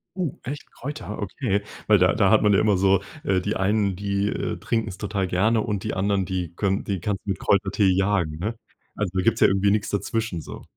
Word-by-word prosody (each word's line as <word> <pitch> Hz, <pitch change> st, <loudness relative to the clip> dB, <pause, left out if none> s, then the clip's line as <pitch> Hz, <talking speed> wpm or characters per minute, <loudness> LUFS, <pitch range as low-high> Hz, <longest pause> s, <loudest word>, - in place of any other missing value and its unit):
Uh. 180 Hz, -7 st, -1 dB
Echt? 145 Hz, +3 st, -7 dB
Kräuter? 145 Hz, -6 st, -6 dB
Okay, 100 Hz, 0 st, -1 dB, 0.3 s
weil 105 Hz, -, +6 dB
da 90 Hz, -1 st, +4 dB
da 100 Hz, -3 st, +3 dB
hat 110 Hz, -, +5 dB
man 105 Hz, -1 st, +4 dB
ja -, -, +5 dB
immer 105 Hz, -3 st, +3 dB
so 95 Hz, 0 st, +3 dB, 0.2 s
äh, 95 Hz, -1 st, +2 dB
die 105 Hz, +3 st, -2 dB
einen, 100 Hz, 0 st, +1 dB
die, 100 Hz, +1 st, -1 dB
äh, -, -, -3 dB
trinken's 115 Hz, -5 st, -2 dB
total 100 Hz, -2 st, -2 dB
gerne 110 Hz, +5 st, +2 dB
und 105 Hz, -4 st, -2 dB
die -, -, -2 dB
anderen, 95 Hz, 0 st, 0 dB
die 90 Hz, -2 st, -3 dB
könn 95 Hz, 0 st, 0 dB
die 100 Hz, -2 st, -2 dB
kannst 95 Hz, +2 st, -2 dB
du -, -, -6 dB
mit 95 Hz, -, -3 dB
Kräutertee 100 Hz, 0 st, +2 dB
jagen, 95 Hz, -4 st, +1 dB
ne? 110 Hz, +6 st, -2 dB, 0.4 s
Also 105 Hz, -4 st, -2 dB
da 95 Hz, -, +2 dB
gibt's -, -, +2 dB
ja -, -, +8 dB
irgendwie 100 Hz, +1 st, +2 dB
nix 105 Hz, 0 st, 0 dB
dazwischen 105 Hz, -3 st, -2 dB
so. -, -, -9 dB
100 Hz, 225 wpm, -24 LUFS, 95-105 Hz, 0.4 s, ja